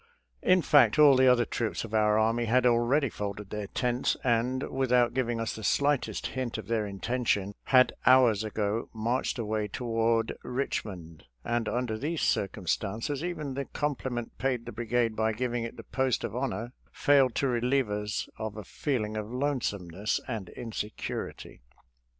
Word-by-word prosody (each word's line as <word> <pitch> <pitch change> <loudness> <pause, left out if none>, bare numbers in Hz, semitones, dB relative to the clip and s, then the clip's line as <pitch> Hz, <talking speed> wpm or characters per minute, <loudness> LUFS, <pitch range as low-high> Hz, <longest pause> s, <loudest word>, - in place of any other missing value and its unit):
In 185 -2 +4
fact, 130 -6 +5
all 150 -3 +8
the 130 0 +5
other 125 -2 +5
troops 115 -1 -2
of 110 -1 -8
our 105 -1 +3
army 115 +2 +2
had 125 +2 +3
already 125 +4 +3
folded 105 -2 -6
their 105 -1 -4
tents, 125 +3 0
and, 125 +2 +1
without 125 -2 +2
giving 120 -3 -1
us 115 - -2
the 110 - -8
slightest 140 +5 +1
hint 130 -3 -3
of - - -6
their 110 -2 -1
intention, 100 -1 -1
had 130 -1 +5
hours 125 -5 +6
ago 110 +1 -2
marched 120 +5 -1
away 110 -2 -1
toward 115 0 0
Richmond, 95 - -4 0.2
and 120 -1 -1
under 120 -3 -2
these 155 +5 -2
circumstances 110 - -1
even 155 -6 -3
the 140 +1 -3
compliment 130 -5 -3
paid 125 -3 -1
the 120 - -6
brigade 115 0 0
by 110 0 +1
giving 120 +1 -2
it 115 - -8
the 115 - -8
post 130 +2 0
of 105 - -4
honor 120 -2 -3 0.2
failed 135 -4 +3
to 140 - +1
relieve 125 -1 +1
us 105 0 -2
of 110 -1 -4
a 105 - -6
feeling 110 -3 -2
of 105 +1 -4
lonesomeness 110 - -1
and 110 -8 -4
insecurity. 110 - -6
120 Hz, 160 wpm, -29 LUFS, 110-130 Hz, 0.2 s, all